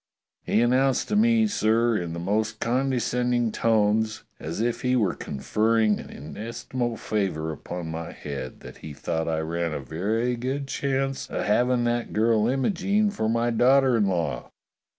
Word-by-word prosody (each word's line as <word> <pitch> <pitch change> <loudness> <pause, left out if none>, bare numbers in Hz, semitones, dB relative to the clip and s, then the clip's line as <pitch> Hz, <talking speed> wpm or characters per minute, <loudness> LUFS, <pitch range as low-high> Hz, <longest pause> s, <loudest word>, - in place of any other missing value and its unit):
He 110 - +1
an 120 - +3
nounced 130 0 +2
to - - 0
me, 225 +1 +4
sir, 115 - +2
in 85 -5 -2
the 85 - -4
most 105 +4 -1
condescending 125 -1 0
tones, 110 0 +1 0.2
as 80 +5 -5
if 120 +1 -1
he 125 0 +1
were 105 -8 +2
conferring 110 +9 +1
an - - -9
inestimable 115 - -5
favour 95 -9 -2
upon 85 +2 -6
my 80 +1 -5
head, 70 -3 -7
that - - -11
he 75 - -9
thought 80 +3 -2
I 80 -1 0
ran 85 0 -2
a - - -3
very 105 - -1
good 135 +4 -3
chance 135 0 -2
of - - -2
hav 120 +4 +3
ing 125 -1 +2
that 120 0 -1
girl 110 0 +3
Imogene 200 - +1
for 110 - -1
my 115 +1 +1
daughter 130 +2 +4
in 105 -3 +2
law. 85 -9 -2
115 Hz, 170 wpm, -25 LUFS, 90-125 Hz, 0.2 s, me